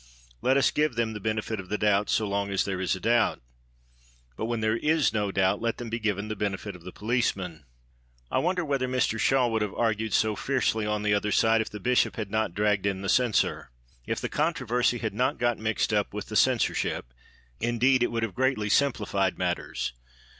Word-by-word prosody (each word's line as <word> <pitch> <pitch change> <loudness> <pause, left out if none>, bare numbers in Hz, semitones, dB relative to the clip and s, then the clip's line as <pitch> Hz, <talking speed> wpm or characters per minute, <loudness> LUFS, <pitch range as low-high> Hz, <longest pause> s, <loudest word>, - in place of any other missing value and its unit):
Let 130 +1 +3
us 140 - +3
give 150 -4 +1
them 115 -1 0
the 105 - -6
benefit 110 +1 -2
of 95 -1 -8
the 105 - -1
doubt, 105 -1 +2
so 110 - +1
long 100 0 -1
as 100 -1 0
there 95 -2 -3
is 95 - +1
a - - -7
doubt. 115 +4 +2 1.0
But - - -3
when 120 0 -2
there 110 +1 +1
is 155 +3 +2
no 105 -2 0
doubt, 95 +1 +1
let 115 0 -1
them 120 -2 -6
be 115 - -2
given 105 -2 -1
the 110 - -3
benefit 100 -1 -3
of 90 - -13
the 90 +2 -9
policeman. 100 - -2 0.7
I - - +2
wonder 180 0 0
whether 135 -3 0
Mr 125 -3 0
Shaw 125 +4 +3
would 110 -1 0
have 105 -2 -2
argued 110 -1 0
so 110 -1 +2
fiercely 110 -4 0
on 105 0 -1
the 105 0 +2
other 105 +1 0
side 110 +1 +4
if 110 - -4
the 105 - -8
Bishop 125 +4 +2
had 105 -5 -5
not 110 -5 -1
dragged 105 -1 +1
in 100 -1 -2
the 95 - -2
Censor. 120 -1 +1 0.4
If - - -1
the - - -2
controversy 130 -6 0
had 110 -3 -3
not 125 +5 0
got 120 -1 0
mixed 110 -1 0
up - - 0
with - - -5
the - - -5
Censorship, - - +1 0.5
indeed, 125 +2 +2
it 120 - +1
would 115 -1 -1
have 115 - -2
greatly 130 -5 0
simplified 105 -7 +1
matters. 90 -7 -2
110 Hz, 210 wpm, -27 LUFS, 100-120 Hz, 1.0 s, side